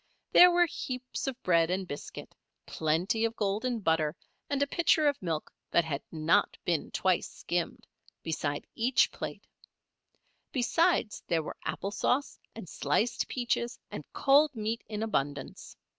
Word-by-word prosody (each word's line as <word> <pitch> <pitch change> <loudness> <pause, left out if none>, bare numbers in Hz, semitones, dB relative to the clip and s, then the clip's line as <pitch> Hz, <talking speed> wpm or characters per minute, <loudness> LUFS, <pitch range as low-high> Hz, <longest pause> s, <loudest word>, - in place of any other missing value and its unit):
There 360 - +9
were 350 0 +4
heaps 255 -5 -5
of 265 -1 -3
bread 170 -2 +3
and 185 +1 -1
biscuit, 145 - -8 0.3
plenty 165 +8 0
of 230 0 0
golden 220 +3 -1
butter, 160 -3 +1 0.3
and 285 -1 +1
a - - +2
pitcher 310 0 +3
of 285 -1 0
milk 165 -4 -3 0.2
that 170 - +3
had 145 -3 -3
not 160 +1 +2
been 170 -4 0
twice 185 -2 +1
skimmed, 175 -1 -3 0.4
beside 145 -3 -2
each 245 +3 +3
plate. - - -6 1.1
Besides, 280 -1 +1
there 165 -2 +1
were - - -7
apple 200 - -3
sauce 255 +6 0 0.2
and 225 -5 -8
sliced 160 +11 0
peaches 240 -1 -1
and - - -6
cold 285 +1 +4
meat 220 +1 -2
in 215 0 -3
abundance. 145 -10 -3
210 Hz, 145 wpm, -30 LUFS, 165-255 Hz, 1.1 s, There